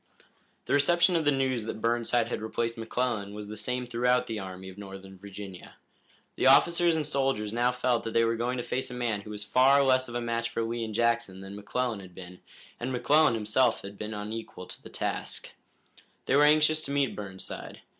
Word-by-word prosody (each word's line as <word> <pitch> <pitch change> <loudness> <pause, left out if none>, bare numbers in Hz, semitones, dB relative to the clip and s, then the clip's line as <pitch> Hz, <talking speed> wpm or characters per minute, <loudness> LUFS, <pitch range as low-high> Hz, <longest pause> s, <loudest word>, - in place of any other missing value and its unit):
The - - -1
reception 170 +5 +4
of 165 -2 +1
the 145 - +5
news 130 -4 0
that 110 - -5
Burnside 115 0 +1
had 115 - -3
replaced 115 +1 -2
McClellan 115 -3 -2
was 105 -1 -7
the 105 - -6
same 125 +4 -2
throughout 125 +1 +2
the 110 -2 -4
Army 95 -1 -7
of 95 - -9
Northern 95 -1 -9
Virginia. 95 -1 -10 0.6
The - - +3
officers 170 -1 +5
and 155 -2 -1
soldiers 135 -6 0
now 120 +1 +2
felt 125 -1 0
that 115 - -3
they 115 - +4
were 115 0 +1
going 120 +2 -1
to 120 - -2
face 130 +2 -2
a 125 - -7
man 115 -4 -1
who 105 - -11
was 105 -1 -5
far 135 +6 +5
less 130 -1 +3
of 120 - -7
a - - 0
match 115 0 -1
for 115 - -2
Lee 115 +1 -2
and 110 -2 -5
Jackson 115 -5 +1
than 95 +1 -8
McClellan 110 +2 -2
had 95 -2 -13
been, 90 -1 -10 0.4
and 125 +2 -3
McClellan 145 +2 +4
himself 110 +4 +1
had 100 0 -9
been 105 0 -4
unequal 105 -3 -6
to - - -9
the - - -11
task. - - -4 0.7
They 135 - +2
were 145 +1 +6
anxious 155 +1 +4
to 140 - -4
meet 140 -2 +1
Burnside. 95 -2 -7
115 Hz, 210 wpm, -28 LUFS, 105-130 Hz, 0.7 s, were